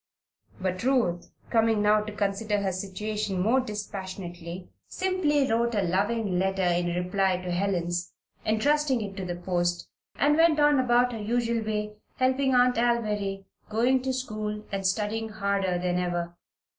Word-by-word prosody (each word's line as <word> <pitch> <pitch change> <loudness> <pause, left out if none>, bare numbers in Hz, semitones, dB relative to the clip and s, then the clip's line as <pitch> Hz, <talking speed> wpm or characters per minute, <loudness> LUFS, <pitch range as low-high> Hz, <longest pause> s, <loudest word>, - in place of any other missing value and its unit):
But 185 -1 -2
Ruth, 235 -10 +1 0.2
coming 225 -2 +3
now 210 +1 +4
to 210 0 -6
consider 205 +1 -1
her 195 -1 0
situation 200 +1 -3
more 225 +8 +3
dispassionately, 190 -5 -6 0.2
simply 340 -7 +1
wrote 235 +1 +1
a 205 - +2
loving 195 +1 0
letter 190 0 0
in 175 0 +2
reply 185 +1 +1
to 180 0 -5
Helen's, 175 -2 -1 0.3
entrusting 270 +3 +2
it 200 -2 -5
to 190 - -4
the 175 -1 -3
post, 175 -1 -1 0.3
and 295 +1 +3
went 325 -2 +4
on 295 -1 +5
upon 245 -1 +3
her 230 - -5
usual 230 +1 0
way, 210 -1 -3 0.2
helping 260 +1 +2
Aunt 250 0 +4
Alviry, 210 -5 0 0.2
going 245 +4 +2
to 260 +1 -1
school, 215 -4 -4
and 195 -1 0
studying 215 +3 -1
harder 200 -3 0
than 180 0 0
ever. 175 -1 -2
210 Hz, 150 wpm, -27 LUFS, 185-235 Hz, 0.3 s, on